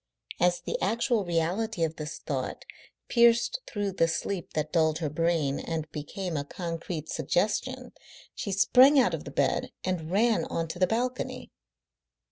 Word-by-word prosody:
As 175 0 +2
the - - -3
actual 230 +2 +1
reality 175 +4 0
of 160 0 -1
this 150 0 -5
thought 130 -4 -4 0.4
pierced 235 - +4
through 205 -2 -2
the 165 -3 +2
sleep 180 +2 -3
that 155 0 -2
dulled 160 -2 +3
her 155 -4 -3
brain 160 -3 +1
and 160 -2 -4
became 170 +4 -5
a 145 - -1
concrete 165 0 -5
suggestion, 215 - -1 0.4
she 200 - -4
sprang 255 +8 +6
out 255 - +3
of - - -4
the - - -6
bed - - 0
and 175 -4 -2
ran 210 -1 +3
on 165 0 -2
to 175 - -6
the 185 - +4
balcony. 250 +5 -2
175 Hz, 155 wpm, -28 LUFS, 160-220 Hz, 0.4 s, sprang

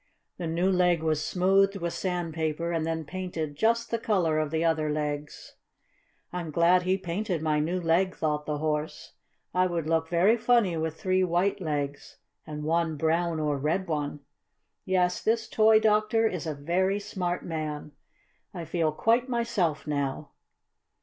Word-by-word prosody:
The 170 - -3
new 175 +4 +1
leg 180 -3 +2
was 155 -1 0
smoothed 195 +3 +3
with 170 -3 -3
sandpaper, 165 -2 -2
and 165 -1 -1
then 160 -1 -2
painted 170 -4 -4
just 230 +7 +1
the 230 - 0
color 175 -9 +1
of 155 -1 -1
the 160 +2 0
other 160 -2 +1
legs. 150 -1 -4 0.8
"I'm 175 -2 -4
glad 170 +3 +4
he 185 +1 +1
painted 180 -1 -3
my 155 -1 +1
new 170 +5 0
leg," 175 +2 +1
thought 150 -1 -2
the 150 -1 -1
Horse. 150 0 -3 0.4
"I 185 +1 +3
would 170 -3 -2
look 160 0 +1
very 185 +7 +4
funny 230 -6 +3
with 160 0 -3
three 185 0 +2
white 185 +3 +1
legs 145 -3 -4 0.3
and 150 -1 -6
one 165 0 0
brown 165 +1 +1
or 150 -2 0
red 165 +7 -1
one. 150 -2 -3 0.6
Yes, 180 -1 +1
this 225 0 0
toy 220 -1 +5
doctor 215 +1 +2
is 180 -5 -4
a 155 - -2
very 185 +7 0
smart 180 -3 -3
man. 155 -2 -4 0.6
I 170 -2 -5
feel 160 -2 0
quite 235 - +1
myself 210 -10 0
now." 140 0 -3
170 Hz, 160 wpm, -27 LUFS, 155-185 Hz, 0.8 s, toy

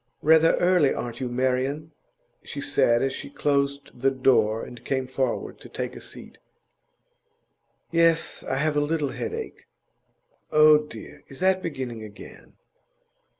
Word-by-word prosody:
'Rather 160 +1 +5
early, 175 -6 +3
aren't 120 -1 -4
you, 130 -2 -3
Marian?' 130 +5 -1 0.5
she - - -8
said, 120 +1 +2
as 135 0 0
she - - -6
closed 140 -1 -1
the 130 +2 +1
door 115 -5 +2
and 120 -1 -12
came 130 0 -1
forward 130 -1 -3
to - - -13
take - - -5
a - - -9
seat. - - -10 1.5
'Yes; 165 -1 +2
I 130 - -2
have 150 +2 0
a - - +3
little 150 -1 0
headache.' 450 - -6 0.8
'Oh, 155 0 +7
dear! 150 -8 -10
Is 135 - -12
that 190 0 +3
beginning 130 -9 -5
again? 105 -1 -13
140 Hz, 140 wpm, -25 LUFS, 125-155 Hz, 1.5 s, Oh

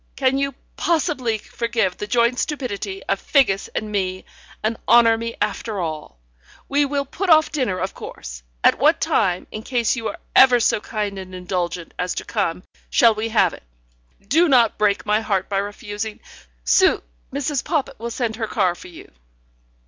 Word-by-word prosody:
Can 270 0 +1
you 275 0 -1 0.2
possibly 280 -9 0
forgive 225 -4 -2
the 210 - -5
joint 235 +2 +2
stupidity 205 -9 -3
of 195 - -1
Figgis 220 -9 +2
and 215 -1 -3
me, 185 -2 -2 0.4
and 220 +1 0
honour 235 -1 +6
me 230 +1 -5
after 210 0 -2
all? 155 - -5 0.5
We 285 +1 +2
will 280 0 -1
put 370 +7 -4 0.2
dinner 245 -11 -1
off, - - -2
of 190 - -3
course. - - -9 0.2
At - - +4
what - - +4
time, 180 0 +1
in 215 - -6
case 240 0 0
you 230 -3 -3
are 325 - -5 0.2
ever 250 -2 +7
so 215 - +2
kind 205 -3 -3
and 185 -1 -9
indulgent 180 -1 -3
as 180 0 -1
to - - -4
come, 185 -5 -2 0.3
shall 230 -2 +5
we 215 +1 -3
have 220 - +3
it? - - -11 0.7
Do 330 +8 +4
not 240 -6 +4
break 205 -1 +2
my 210 +1 +2
heart 195 -4 -1
by 195 -1 0
refusing. 205 +1 -5 0.4
Su - - +4 0.3
Mrs. 280 0 -1
Poppit 275 -6 -2
will 235 +1 -4
send 235 -2 -2
her 225 -2 -2
car 190 -6 +1
for 175 - -12
you." 175 - -13
220 Hz, 175 wpm, -21 LUFS, 195-250 Hz, 0.7 s, ever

